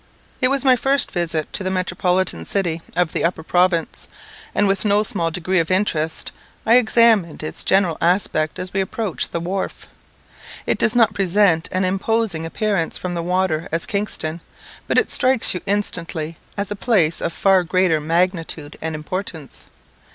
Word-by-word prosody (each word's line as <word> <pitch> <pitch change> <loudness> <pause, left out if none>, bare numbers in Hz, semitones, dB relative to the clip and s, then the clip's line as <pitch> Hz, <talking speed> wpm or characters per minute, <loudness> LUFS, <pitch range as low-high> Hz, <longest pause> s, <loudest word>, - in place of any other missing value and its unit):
It 255 - +6
was 275 +1 +1
my 260 -1 +6
first 270 +2 +2
visit 165 -3 -2
to 200 - -1
the 185 - -1
metropolitan 185 - 0
city 170 - -2
of 180 -2 0
the - - -1
upper 170 -1 -1
province, 175 0 0 0.5
and 205 - +3
with 195 0 0
no 210 0 +2
small 175 -5 0
degree 180 +2 -1
of 165 - -1
interest 165 -5 -1 0.3
I 230 +2 +6
examined 220 -8 +3
its 155 - -1
general 190 -4 +2
aspect 170 -3 +1
as 185 +1 -6
we 195 - +1
approached 195 -1 -3
the 170 - -2
wharf. 185 +3 -4 0.8
It - - 0
does 235 - +3
not 225 -3 +4
present 190 -4 +2
such 185 - -4
an 185 - +1
imposing 195 -3 -1
appearance 195 -2 -1
from 180 -1 -4
the 170 - -2
water 175 -2 -1
as 165 +1 -1
Kingston, 175 -5 -3 0.5
but - - 0
it - - +3
strikes 255 -2 +3
you 180 - -4
instantly 165 -5 -1 0.2
as 200 0 -3
a - - -1
place 195 -8 +1
of - - -1
far 190 +1 +3
greater 175 -2 +1
magnitude 165 -2 -1
and 160 0 -3
importance. 160 -2 -6
185 Hz, 170 wpm, -20 LUFS, 165-205 Hz, 0.8 s, It